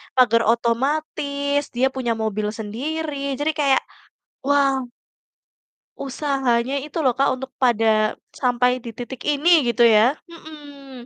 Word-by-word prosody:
pagar 230 -3 +4
otomatis 280 +4 0
dia 260 +2 +3
punya 245 -3 -2
mobil 215 -1 -2
sendiri, 280 +6 -4
jadi 310 +2 +1
kayak 275 -3 +3 0.6
wow 275 -1 +2 1.3
usahanya 265 -2 0
itu 305 - -8
loh 250 - +3
Kak, 275 +3 +1
untuk 265 0 -8
pada 220 -3 +2 0.2
sampai 250 0 +1
di 235 - -8
titik 245 +1 -7
ini 315 +3 +4
gitu 235 0 +3
ya, 230 +6 +4
mhm. 290 -6 -12
265 Hz, 120 wpm, -21 LUFS, 235-285 Hz, 1.3 s, pagar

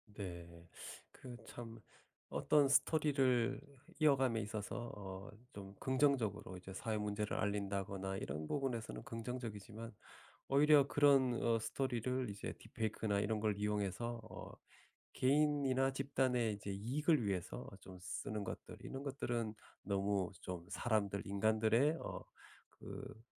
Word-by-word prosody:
네. 85 -3 -7 0.4
그 125 -2 -9
참 115 -1 -8 0.5
어떤 145 -2 +4
스토리를 135 -4 +3 0.4
이어감에 135 -6 +4
있어서 110 +2 -4
어 95 -1 -7 0.2
좀 100 0 -9
긍정적으로 130 -9 +1
이제 95 +1 -9
사회 110 +2 -2
문제를 105 0 -1
알린다거나 100 -1 -1
이런 75 -2 -4
부분에서는 130 -5 -2
긍정적이지만 115 -2 -5 0.6
오히려 145 0 +7
그런 140 -4 +5
어 115 -1 +3
스토리를 125 +2 -1
이제 100 0 -4
딥페이크나 110 -2 -1
이런 105 +1 0
걸 105 -1 +1
이용해서 105 +3 -1
어 - - -8 0.6
개인이나 135 -1 +3
집단의 130 -4 +1
이제 100 -1 -5
이익을 130 - +2
위해서 95 -4 -2
좀 95 -1 -10
쓰는 105 +2 -3
것들 - - -6
이런 135 +1 -6
것들은 120 -5 -2 0.3
너무 100 -1 +1
좀 90 -2 -5
사람들 100 -1 0
인간들의 110 +9 +3
어 - - -5 0.5
그 110 - -8
110 Hz, 280 characters per minute, -38 LUFS, 100-130 Hz, 0.6 s, 오히려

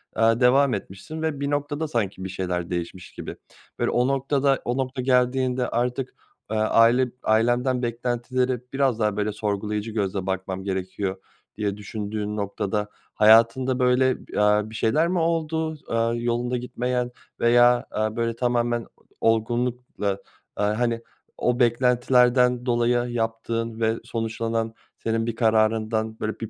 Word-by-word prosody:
aaa, 115 +1 +3
devam 130 +1 +4
etmişsin 100 +10 -6
ve 155 -3 -2
bir 140 - -1
noktada 145 +2 -1
sanki 100 -8 -2
bir 95 - -4
şeyler 90 -2 -3
değişmiş 90 0 -5
gibi. - - -7 0.4
Böyle, - - +1
o 125 +1 +2
noktada, 135 0 +1
o 120 +1 -1
nokta 130 0 -2
geldiğinde 125 0 +1
artık, 125 +2 -2 0.3
aaa, 110 - -2
aile 115 +3 +4
ailenden 120 +3 +2
beklentilere 120 +1 -1
biraz 135 -4 +1
daha, 105 -2 0
böyle, 105 0 0
"Sorgulayıcı 105 +1 -2
gözle 100 -3 -2
bakmam 95 0 -3
gerekiyor." 95 0 -3 0.4
diye 105 -2 -2
düşündüğün 105 0 -4
noktada, 105 +1 -2 0.2
hayatında, 115 +4 +5
böyle, 125 +1 +2
b - - -15
eee, 105 0 +4
bir 110 - -10
şeyler 150 +9 +2
mi 180 0 0
oldu? 160 -1 -1
Aaa, 115 0 +1
yolunda 120 +1 -1
gitmeyen 125 0 -2 0.3
veya, 120 +1 +5
eee, 110 0 0
böyle 115 -1 -1
tamamen 120 -1 0 0.4
o 115 - +4
olgunlukla, 120 -1 -1 0.5
eee, 105 - +2
hani, 115 +2 0 0.4
o 125 +1 0
beklentilerden 125 +1 +3
dolayı 120 0 +1
yaptığın 115 0 -2
ve 110 0 +2
sonuçlanan 115 0 -2 0.2
senin 115 0 -1
bir 115 -1 -3
kararından, 110 -1 +1
böyle, 110 0 -3
bir 115 - -5
115 Hz, 140 wpm, -24 LUFS, 110-125 Hz, 0.5 s, hayatında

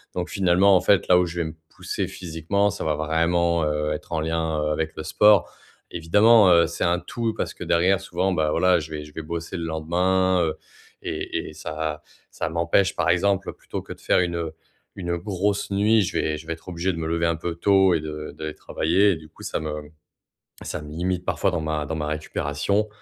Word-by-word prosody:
Donc 90 -1 -3
finalement 95 +1 +4
en - - 0
fait, 100 +1 +3
là 90 - +7
où 90 - +2
je 85 0 -5
vais - - -1
me 80 - -6 0.2
pousser - - -3
physiquement, 90 +4 -1
ça 100 - -5
va 75 -1 +1
vraiment, 85 +2 +1
heu, 75 0 -1
être 75 - -8
en 80 - 0
lien, 80 -1 -1
heu, 75 - 0
avec 80 +1 -2
le 80 - -5
sport. 105 +4 +4 0.4
Évidemment, 105 +5 +5
heu, 85 -1 +5
c'est 85 - -4
un 85 +1 +2
tout 115 +2 -3
parce - - -3
que - - -8
derrière 90 +3 +3
souvent, 95 0 -1
bah, 80 -3 +1
voilà, 90 -2 +3
je 80 +1 -8
vais 75 -1 -5
je 75 0 -14
vais 80 - -6
bosser 85 +3 -5
le 85 - -4
lendemain, 90 +3 +1
heu 80 -1 -1 0.5
et - - -4
et - - -11
ça 80 -1 -4 0.3
ça - - -3
m'empêche 85 +4 +1
par 80 - +1
exemple, 95 +3 +1
plutôt - - -7
que - - -8
de - - -19
faire - - +3
une 85 -2 -1 0.4
une 85 -2 -2
grosse 100 +2 -1
nuit, 105 +2 +3
je 95 - -2
vais 75 -1 0
je 80 - -11
vais 80 - -2
être 80 - -14
obligé 90 +2 -1
de 85 - -6
me 80 -1 -3
lever 85 +1 0
un 85 -1 +1
peu 85 0 -4
tôt 95 +1 +4
et 80 - +1
de 75 0 -6
d'aller 80 -1 -5
travailler 95 +6 +2
et - - 0
du 80 -1 -12
coup - - -15
ça - - -2
me 75 -1 -5 0.7
ça 75 - -5
me 75 - -10
limite 90 +2 -2
parfois 100 - +1
dans 85 -2 -2
ma 80 -1 -2
dans 80 - -3
ma 75 -1 -3
récupération, 75 +6 -1
85 Hz, 225 wpm, -24 LUFS, 80-95 Hz, 0.7 s, là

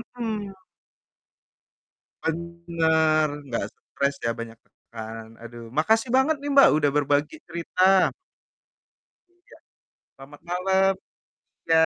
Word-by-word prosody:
Mhm. 215 -4 -4 1.7
Bener, 160 -2 +1 0.2
nggak 120 - -2
stres 140 0 -3
ya, - - +2
banyak 115 -1 -7
tekan. 110 0 -10
Aduh, 120 0 -10
makasih 225 +9 +2
banget 270 +4 +3
nih, 290 - -4
Mbak, 275 0 +8
udah 145 -1 +2
berbagi 145 - +1
cerita. 185 +3 +2 1.2
Iya, 355 0 -21 0.6
selamat 140 +2 -14
malam, 190 +2 +2 0.7
iya. 160 - +4
165 Hz, 95 wpm, -25 LUFS, 145-195 Hz, 1.7 s, Mbak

